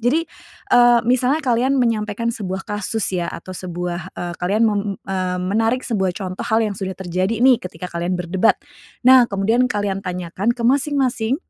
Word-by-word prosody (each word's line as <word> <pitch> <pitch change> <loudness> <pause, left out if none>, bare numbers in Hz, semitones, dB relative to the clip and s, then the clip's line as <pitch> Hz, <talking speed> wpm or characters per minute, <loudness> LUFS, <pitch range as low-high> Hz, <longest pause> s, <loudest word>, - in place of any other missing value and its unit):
Jadi, 275 +8 +1 0.5
eee, 240 -1 +6
misalnya 255 +5 +2
kalian 255 +2 +2
menyampaikan 230 -2 0
sebuah 190 -3 -5
kasus 210 0 -2
ya 175 -2 -1
atau 185 +2 -7
sebuah, 175 -1 -5
eee, 175 0 -4
kalian 205 +6 +2
mem 210 -2 +2 0.2
eee, 185 -1 -2
menarik 225 +6 0
sebuah 190 -6 -1
contoh 185 -2 -5
hal 225 +1 +3
yang 210 - -2
sudah 190 -1 -5
terjadi 185 +4 -1
nih 260 -3 +5
ketika 180 0 -8
kalian 175 +2 -1
berdebat. 180 +4 +2 0.5
Nah, 255 -1 +7
kemudian 225 +6 +1
kalian 205 -3 -2
tanyakan 185 +5 -2
ke 235 - -5
masing-masing, 265 -2 +1
210 Hz, 160 wpm, -20 LUFS, 185-240 Hz, 0.5 s, Nah